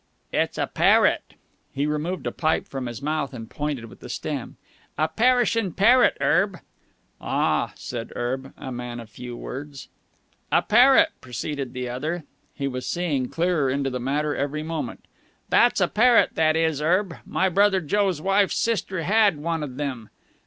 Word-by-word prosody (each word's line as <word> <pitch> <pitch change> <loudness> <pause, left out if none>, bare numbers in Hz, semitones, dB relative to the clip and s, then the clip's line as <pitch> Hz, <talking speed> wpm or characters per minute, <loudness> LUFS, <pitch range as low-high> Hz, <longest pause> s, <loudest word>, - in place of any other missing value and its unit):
"It's - - 0
a - - +1
parrot!" - - +3 0.4
He 140 +1 -1
removed 150 +5 -2
a - - -1
pipe 160 -1 0
from 135 -2 -5
his 120 +2 -7
mouth 150 -2 -2
and 115 -2 -7
pointed 145 -2 -4
with 115 - -14
the - - -10
stem. - - -5 0.4
"A 155 - +2
perishin' 230 0 +2
parrot, 240 +6 +5
Erb." 190 +1 +2 0.6
"Ah!" - - 0
said 115 -2 -6
Erb, 130 +3 -3
a 130 - -7
man 120 -1 -5
of 115 -2 -11
few 125 +1 -8
words. 140 +1 -8 0.6
"A - - +4
parrot," 270 +8 +6
proceeded 130 +1 -5
the 125 -1 -4
other. 155 +8 -3 0.3
He 140 - -2
was 125 -1 -4
seeing 150 -8 -1
clearer 165 -5 +1
into 135 0 -1
the 125 - -3
matter 145 +4 -1
every 145 +2 -2
moment. 160 -1 -5 0.4
"That's 240 -2 +4
a 180 - +3
parrot, 235 +4 +4
that 155 -1 +2
is 160 -3 +1
Erb. 180 +2 +1
My 190 - 0
brother 195 +1 +3
Joe's 185 +1 0
wife's 195 +3 +2
sister 190 -6 -1
had 205 -2 +3
one 165 +2 -2
of 140 -2 -6
'em. 130 -7 -4
150 Hz, 165 wpm, -24 LUFS, 130-190 Hz, 0.6 s, parrot